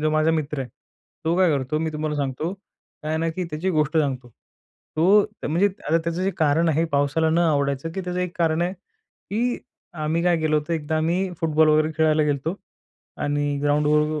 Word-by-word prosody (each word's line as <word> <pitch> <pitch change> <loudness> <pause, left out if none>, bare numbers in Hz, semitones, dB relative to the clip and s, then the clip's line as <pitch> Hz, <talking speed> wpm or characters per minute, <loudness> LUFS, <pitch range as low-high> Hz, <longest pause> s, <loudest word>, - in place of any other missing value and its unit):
जो 155 0 +1
माझा 155 +1 +3
मित्र 150 -3 -1
आहे, 130 - -4 0.6
तो 165 +2 +1
काय 185 -2 +5
करतो 135 +3 -2
मी 160 0 -1
तुम्हाला 150 0 -2
सांगतो. 145 +4 -2
काय 185 -5 -14
आहे 160 - 0
ना 165 0 0
की 180 +3 -3
त्याची 160 +5 -1
गोष्ट 155 -1 +1
सांगतो, 130 -4 -1 0.7
तो 200 +6 +5 0.2
म्हणजे 180 +6 +3 0.2
आता 165 +2 +4
त्याचं 170 +2 -3
जे 195 - +1
कारण 160 +1 +3
आहे 160 +2 +2
पावसाला 145 +3 +2
न 165 - +2
आवडायचं, 145 -2 +1
की 190 - -3
त्याचं 180 0 -3
एक 180 -1 -3
कारण 165 0 +2
आहे, 180 - -1
की 245 - -5 0.5
आम्ही 160 +2 0
काय 175 -1 +3
गेलो 155 -1 +1
होतो 150 +3 -4
एकदा 160 -1 -1
आम्ही 175 +4 0
फुटबॉल 160 -1 +3
वगैरे 155 +1 +3
खेळायला 155 -1 +3
गेलो 145 +3 -1 0.7
आणि 145 0 0
ग्राऊंडवर 150 +1 +2
160 Hz, 190 wpm, -23 LUFS, 150-170 Hz, 0.7 s, काय